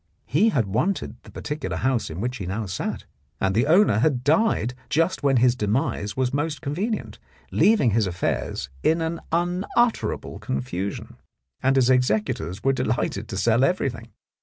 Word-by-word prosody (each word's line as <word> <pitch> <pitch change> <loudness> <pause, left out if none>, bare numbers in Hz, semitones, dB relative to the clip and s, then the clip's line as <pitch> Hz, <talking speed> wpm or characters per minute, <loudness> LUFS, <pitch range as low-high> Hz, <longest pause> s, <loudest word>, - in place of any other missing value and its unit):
He 155 - +3
had 125 - +1
wanted 110 - -1
the - - -15
particular 150 0 -4
house 130 -3 0
in 80 +2 -6
which 125 +2 -2
he 95 -5 -5
now 105 +4 -2
sat, 90 -2 -4 0.3
and 95 0 +1
the 120 +7 +2
owner 170 - +5
had 125 -1 +1
died 150 - +2 0.2
just 165 +5 +1
when 140 -2 +3
his 125 0 +4
demise 105 -1 -1
was 130 0 0
most 145 +1 -1
convenient, 195 +11 -3 0.3
leaving 210 - +4
his 110 -1 +2
affairs 85 -6 -2
in 165 - +1
unutterable 180 +8 0
confusion, 90 +10 -4 0.4
and 135 +1 +3
his 130 -1 +4
executors 110 -6 0
were 135 - +3
delighted 115 -4 -1
to 100 - -5
sell 115 +4 +3
everything. 130 -8 0
130 Hz, 155 wpm, -24 LUFS, 110-160 Hz, 0.4 s, owner